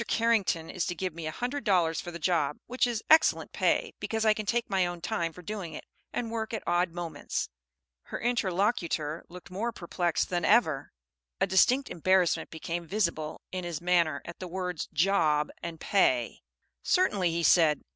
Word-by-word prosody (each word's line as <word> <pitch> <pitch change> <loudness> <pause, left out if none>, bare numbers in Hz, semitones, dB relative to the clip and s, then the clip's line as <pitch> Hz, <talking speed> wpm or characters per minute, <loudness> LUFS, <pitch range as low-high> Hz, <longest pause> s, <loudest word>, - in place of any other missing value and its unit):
Carrington 220 -8 +1
is 185 - -2
to 175 - -2
give 185 0 -3
me 165 -1 -6
a - - -2
hundred 250 - -3
dollars 175 -7 +2
for - - -7
the 170 - -6
job; 160 -3 +1
which 250 +1 +1
is 230 -2 -2
excellent 315 0 +4
pay, - - +1
because 220 0 -2
I 215 - +6
can 215 -1 -5
take 235 +2 +1
my 190 -3 +2
own 175 0 -5
time 170 -1 -2
for 180 +2 -13
doing 195 -3 -5
it, - - -7 0.3
and 230 -2 -3
work 225 0 -3
at 220 - -5
odd 175 +1 +2
moments." 165 -3 -4 0.6
Her - - -5
interlocutor 190 -8 0
looked 180 0 -12
more 220 +6 -2
perplexed 175 -4 -1
than 175 -1 0
ever. 165 - +3 0.5
A - - +3
distinct 255 +8 +3
embarrassment 185 +1 +2
became 170 +1 -5
visible 170 -6 -1
in 185 -1 -4
his 170 -3 -4
manner 170 -4 +2
at 170 - -9
the 185 - -5
words 180 -2 -3
"job" 155 -3 +2
and 165 -1 -6
"pay." 130 - +1 0.4
"Certainly," 205 - +2
he 170 0 -1
said. 160 -3 +4
180 Hz, 180 wpm, -29 LUFS, 165-210 Hz, 0.6 s, I